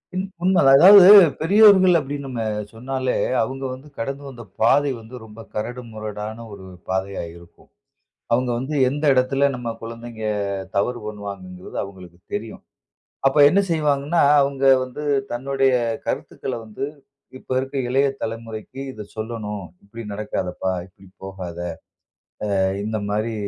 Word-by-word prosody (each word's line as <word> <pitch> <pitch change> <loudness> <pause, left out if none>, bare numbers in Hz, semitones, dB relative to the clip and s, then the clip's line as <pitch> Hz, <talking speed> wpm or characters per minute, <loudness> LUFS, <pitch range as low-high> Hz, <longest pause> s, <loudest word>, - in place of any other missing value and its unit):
ம். 190 +1 -2 0.2
உண்மதான் 155 -8 +5
அதாவது 190 +2 +9 0.3
பெரியோர்கள் 190 -1 +6
அப்டின்னு 140 0 -5
நம்ம 120 -3 -4 0.3
சொன்னாலே, 130 +2 -3 0.3
அவுங்க 135 +4 -3
வந்து 135 +4 -11
கடந்து 135 +4 -4
வந்த 120 -3 -10 0.2
பாதை 140 +5 +4
வந்து 115 +3 -12
ரொம்ப 110 +1 -12
கரடுமுரடான 110 -1 -6
ஒரு 95 -1 -11 0.2
பாதையா 95 0 -2
இருக்கும். 85 0 -19 0.6
அவுங்க 125 +1 +1
வந்து 140 +4 -4
எந்த 145 +3 -3
எடத்தில 135 +2 +2
நம் 115 -2 -6
கொழந்தைங்க 115 -1 -8 0.5
தவறு 120 +5 0
பண்ணுவாங்கங்கிறது 100 -3 -8
அவங்களுக்கு 90 -3 -12 0.2
தெரியும். 110 +1 -7 0.6
அப்ப 135 - +2
என்ன 195 +6 +3
செய்வாங்கன்னா, 150 +1 +1 0.2
அவுங்க 140 0 -2 0.2
வந்து 130 +4 -8 0.3
தன்னுடைய 135 +1 +1 0.3
கருத்துக்கள - - -4
வந்து 110 +5 -5 0.5
இப்ப - - -8
இருக்கிற 135 +1 -3
இளைய 135 +2 +2 0.2
தலைமுறைக்கி 115 +3 -6
"இதை 105 -4 -9
சொல்லணும். 110 -3 -5 0.2
இப்டி 115 +3 -9
நடக்காதப்பா, 95 -3 -3
இப்டி 95 +1 -21 0.2
போகாத. 95 -3 -7 1.0
அ - - +1 0.3
இந்த 110 0 -2
மாரி 110 +2 -1
120 Hz, 125 wpm, -22 LUFS, 105-135 Hz, 1.0 s, அதாவது